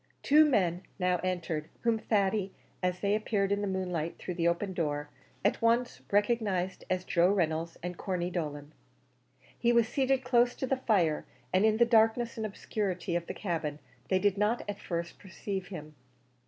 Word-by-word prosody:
Two 305 +2 +6
men 185 - +2 0.2
now 180 -2 +1
entered, 170 -4 -2
whom 230 -1 +2
Thady, 200 -2 +1 0.3
as 180 -1 -1
they 200 0 +2
appeared 210 -2 0
in 200 0 +1
the 205 - -1
moonlight 180 -4 -2
through 180 - -5
the 170 -1 +1
open 185 +3 0
door, 150 -3 -2 0.3
at 205 - +2
once 235 +2 +2
recognised 205 -3 +1
as 185 0 0
Joe 175 +1 +3
Reynolds 165 -4 0
and 180 0 -4
Corney 180 -2 -2
Dolan. 150 -4 -4 0.9
He 240 - +3
was 235 -2 +4
seated 265 0 +1
close 245 -1 +3
to - - -2
the 265 +1 0
fire, 180 -11 +1 0.3
and 190 +3 +4
in 215 0 +2
the 235 - +6
darkness 230 0 +3
and 220 -1 -2
obscurity 195 -4 -3
of 175 0 -2
the - - -5
cabin, 160 -6 -2 0.3
they 190 - +3
did 200 +1 +1
not 215 +3 +1
at 205 0 -4
first 170 -1 -4
perceive 190 -1 -5
him. 155 -5 -8
190 Hz, 175 wpm, -30 LUFS, 175-220 Hz, 0.9 s, Two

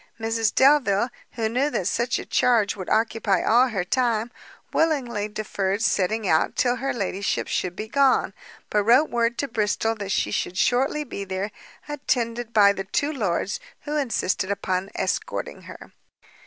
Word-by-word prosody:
Mrs 225 0 0
Delvile, 255 -5 +4 0.2
who 225 -2 -1
knew 255 +6 +1
that 190 - -2
such 235 +5 0
a - - -6
charge 225 -5 +2
would 185 -3 -7
occupy 220 -3 +1
all 245 +3 +4
her 200 -7 -2
time, 235 +2 0 0.4
willingly 250 -10 0
deferred 205 -1 -2
setting 205 +2 +1
out 160 -2 +2
till 245 -1 +1
her 270 +3 -2
ladyship 200 -3 -2
should 180 -1 -2
be 215 - -5
gone, 275 +2 +2 0.4
but 210 - +3
wrote 250 +8 +4
word 235 0 +1
to 280 - -1
Bristol 225 -1 0
that 200 -3 -6
she - - 0
should 180 - -2
shortly 270 +7 +1
be 225 -7 -6
there, 190 +2 -4 0.4
attended 240 -5 -2
by 205 -3 +6
the 195 -1 -5
two 285 +10 -1
lords, 200 - -1 0.2
who 295 - -4
insisted 230 -9 0
upon 190 -1 -2
escorting - - -3
her. - - -11
225 Hz, 160 wpm, -24 LUFS, 200-250 Hz, 0.4 s, by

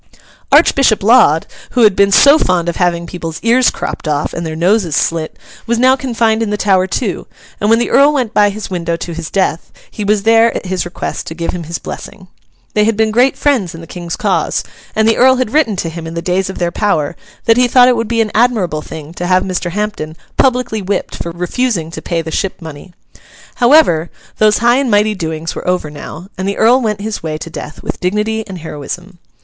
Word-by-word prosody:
Archbishop 245 -7 +4
Laud, 205 - +5 0.3
who - - +5
had 210 -3 +5
been 200 0 +3
so 285 +8 +6
fond 175 -2 0
of 170 - -2
having 170 -1 0
people's 165 -2 -6
ears 240 +2 +4
cropped - - -5
off 150 -1 -1
and 170 - -4
their 155 - -5
noses 175 -1 +1
slit, 165 -1 -1 0.3
was 235 0 +1
now 255 +2 +4
confined 230 -4 0
in 225 - -1
the 210 - -1
Tower 190 -3 +2
too; 190 +1 -3 0.3
and 205 - 0
when 225 - +5
the 240 - -1
Earl 280 +2 +5
went 255 -7 -1
by 205 0 +4
his 205 +1 -6
window 170 -2 -2
to 170 0 -6
his 165 -1 -6
death, 185 -4 -1 0.2
he 210 - -5
was 205 0 +1
there, 225 +1 +4
at - - -4
his 185 -1 -2
request, 175 - -5
to 160 - -6
give 170 0 -3
him 175 -2 -6
his 170 +1 -4
blessing. - - -9 0.5
They 210 0 +3
had 225 -1 0
been 220 0 +2
great 250 +4 +2
friends 240 - 0
in 165 - -9
the - - -10
King's 170 0 -6
cause, - - 0 0.3
and 220 0 +2
the 225 - +3
Earl 260 +1 +5
had 255 -3 -2
written 290 -9 +2
to 170 -2 -3
him 165 0 -7
in 165 - -7
the 170 - -3
days 185 +1 0
of 190 - -6
their 175 -1 -1
power 170 -6 0 0.3
that 225 0 +4
he 250 0 +4
thought 250 +1 +5
it 250 - +4
would 230 -1 -2
be 230 0 +1
an 215 -2 -1
admirable 215 -10 +1
thing 155 0 -9
to 175 0 -4
have 185 0 +3
Mr. 185 -2 -3
Hampden 180 -5 -4 0.2
publicly 250 -4 +1
whipped 195 0 -3
for 170 - -5
refusing 175 0 -2
to 160 - -7
pay 165 -1 -2
the 160 - -6
ship 195 +2 -2
money. 160 +1 -10 0.7
However, 240 - +4 0.3
those 215 -1 +4
high 240 +1 +5
and 275 -2 0
mighty 210 0 +3
doings 160 -3 -4
were - - -7
over 180 -4 -1
now, 150 +3 -9
and 190 - -2
the 200 - -2
Earl 245 +4 +4
went 210 -3 -2
his 215 0 -4
way 155 -1 -4
to 165 +2 -8
death 150 - -8
with - - -5
dignity 210 +4 -1
and 190 -2 -7
heroism. 175 +3 -8
195 Hz, 225 wpm, -15 LUFS, 170-225 Hz, 0.7 s, so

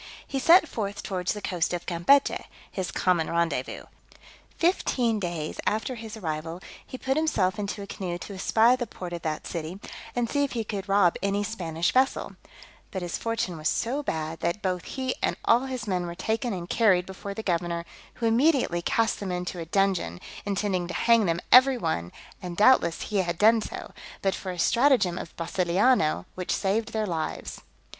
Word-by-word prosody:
He 270 - -3
set 330 +4 +6
forth 205 -5 -4
towards 185 -2 -1
the 210 -1 -8
coast 180 -2 0
of 175 - -6
Campechy, 185 +12 +3 0.3
his 185 -3 -3
common 170 0 +1
rendezvous: 170 -6 -1 0.7
fifteen 250 - +1
days 170 -5 -4
after 220 +5 0
his 225 -2 -8
arrival, 165 -2 -4 0.2
he 255 - -8
put 265 +1 -1
himself 220 -11 +1
into 200 0 -3
a - - -6
canoe 180 -3 -4
to 200 - -8
espy 225 +5 +4
the 245 -2 -4
port 180 -3 -7
of 170 - -4
that 155 -2 -3
city, 170 +2 -5 0.4
and 240 -1 +1
see 285 +4 +1
if 280 - -2
he 230 -2 -1
could 205 -2 -5
rob 195 -3 +4
any 200 +1 0
Spanish 170 -6 -1
vessel; 265 +1 +1 0.5
but 190 -3 -4
his 175 - -3
fortune 225 -7 -2
was 155 0 0
so 260 +6 -1
bad, 160 - -3
that 170 +5 -2
both 180 -2 -1
he 260 -1 -2
and - - 0
all 240 +3 +4
his 255 -3 -4
men 180 -3 -1
were 170 - -6
taken 225 +6 -1
and 175 -3 -4
carried 190 -5 +3
before 195 +1 -7
the 220 - -5
governor, 170 -2 -1 0.3
who 235 - -3
immediately 240 - +3
cast 225 +5 +1
them 195 -2 -4
into 180 0 -3
a 165 - -4
dungeon, 180 - 0 0.3
intending 195 -3 0
to 180 - -5
hang 230 -4 +4
them 165 0 +1
every 260 +1 +8
one; 125 - -2 0.3
and 175 -2 -6
doubtless 210 -7 +4
he 210 - -2
had 175 -3 0
done 220 +3 +5
so, - - -7 0.3
but 195 -1 +2
for 190 - -5
a 180 - -7
stratagem 235 -3 +3
of - - -9
Brasiliano, 175 - +2
which 185 -1 -4
saved 210 +3 0
their 220 -1 -1
lives. 165 -5 -4
195 Hz, 185 wpm, -27 LUFS, 175-230 Hz, 0.7 s, every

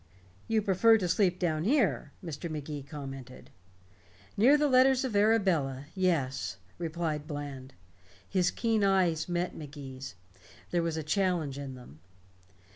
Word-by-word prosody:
"You 220 -1 +1
prefer 215 +4 +5
to 185 -4 -1
sleep 180 +1 +2
down 160 -3 0
here," 195 - +1
Mr. 165 +1 -5
Magee 150 -1 -5
commented. 135 -3 -9 0.8
"Near 255 +8 +6
the 295 0 +2
letters 260 0 +4
of 240 -5 -3
Arabella 185 -11 +2
yes," 150 - 0 0.2
replied 160 -3 -3
Bland. 140 -3 -7 0.5
His 180 -2 +2
keen 225 -3 0
eyes 180 -5 +2
met 175 +1 -1
Magee's. 135 - -8 0.6
There 175 - +2
was 165 -1 -2
a 160 - -3
challenge 160 -4 0
in 135 -2 -6
them. 120 - -14
165 Hz, 130 wpm, -30 LUFS, 140-195 Hz, 0.8 s, Near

